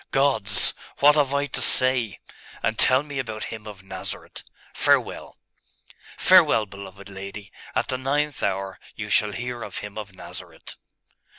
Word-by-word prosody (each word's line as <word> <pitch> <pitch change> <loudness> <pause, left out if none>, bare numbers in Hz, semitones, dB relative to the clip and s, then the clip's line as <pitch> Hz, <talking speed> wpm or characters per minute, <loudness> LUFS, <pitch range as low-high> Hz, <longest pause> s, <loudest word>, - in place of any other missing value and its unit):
Gods! 110 -8 +3 0.2
What 145 +1 +6
have 145 -3 +2
I 140 0 +1
to 145 - -1
say?.... 125 -7 +4 0.5
And 110 - -1
tell 130 +2 +5
me 145 -2 -6
about 110 -4 -4
Him 110 -1 -9
of 100 -3 -10
Nazareth. 95 - -7 0.3
Farewell!' - - 0 0.8
'Farewell, 160 -12 +5
beloved 100 -1 -11
lady! 100 +1 -9 0.2
At - - 0
the 130 - -2
ninth 145 +3 -1
hour, 95 -1 -2 0.2
you - - -6
shall 105 - +3
hear 120 +3 -5
of - - -7
Him 105 +1 -6
of 100 -3 -9
Nazareth. - - -10
110 Hz, 150 wpm, -24 LUFS, 100-135 Hz, 0.8 s, What